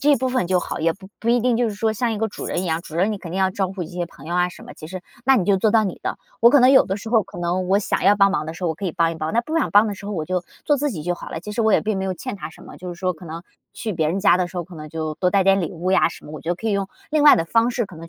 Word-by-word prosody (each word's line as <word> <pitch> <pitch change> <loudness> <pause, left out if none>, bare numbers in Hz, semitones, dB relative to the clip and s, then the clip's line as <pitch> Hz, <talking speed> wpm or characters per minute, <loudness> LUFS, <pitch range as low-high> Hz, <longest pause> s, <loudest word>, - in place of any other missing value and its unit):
这 290 +3 +3
一 285 - +6
部 260 +2 -1
分 255 -7 0
就 185 -1 +3
好， - - -5
也 165 0 +2
不 190 +1 -14
不 230 - -3
一 240 +1 +4
定 245 -1 +2
就 240 -1 +1
是 205 - -5
说 220 +1 +1
像 230 +1 -1
一 210 - -3
个 225 0 0
主 - - -8
人 180 - -2
一 - - -3
样， 165 0 -1
主 160 -3 -9
人 195 +5 +2
你 205 - -4
肯 170 - -9
定 190 - -2
要 190 - +3
照 190 0 -1
顾 190 -2 -5
一 - - -8
些 175 +1 -4
朋 155 -3 -14
友 170 - -3
啊 180 0 +2
什 - - -12
么， - - -11
其 155 - -10
实 185 0 -6 0.2
那 270 0 +5
你 190 - +1
就 195 +1 +3
做 210 +3 +2
到 220 -1 +4
你 190 - -4
的。 - - -3 0.2
我 235 - +7
可 285 - +6
能 255 +1 +7
有 265 - +7
的 195 - -2
时 220 +2 -8
候 225 -2 +4
可 195 -2 -12
能， 180 +1 -1
我 195 +1 +4
想 205 - -1
要 200 +2 +5
帮 195 -1 +4
忙 155 - -1
的 160 - -4
时 180 +2 -7
候， - - +2
我 - - -3
可 200 - -7
以 180 - 0
帮 165 -2 +1
一 - - -7
帮， 155 +2 -3
那 235 - +3
不 310 +7 -4
想 320 - +1
帮 205 +2 +6
的 205 - -3
时 200 +1 -10
候 210 - -4
我 160 -5 -2
就 180 +1 -1 0.2
做 295 -2 +3
自 290 +1 -1
己 160 -8 -5
就 175 0 0
好 - - -9
了。 - - -4
其 210 +5 -7
实 230 - 0
我 220 -1 +3
也 - - +5
并 215 -2 -1
没 190 - -2
有 190 - -1
欠 250 +6 -6
他 155 -5 -7
什 - - -16
么， - - -12
就 180 -1 -7
是 175 - -12
说 185 -1 0
可 170 +2 -14
能 165 +1 -7 0.3
去 220 -2 -4
别 160 -3 0
人 185 +4 -1
家 195 - +5
的 180 -1 -1
时 185 - -11
候， 175 - -2
可 180 0 -13
能 155 -1 -8
就 155 0 -4
多 180 +2 +1
带 195 -2 +3
点 195 0 +4
礼 170 - -2
物 180 +1 -2
呀 - - +4
什 - - -12
么， 150 - -10
我 155 - -7
就 175 +1 -2
可 225 - -6
以 215 - +1
用， 195 -1 -1 0.2
另 305 -1 +2
外 295 - +8
的 165 - 0
方 230 +7 +2
式 240 -3 -1
可 185 - -13
能 165 +1 -10
190 Hz, 430 characters per minute, -22 LUFS, 170-220 Hz, 0.3 s, 外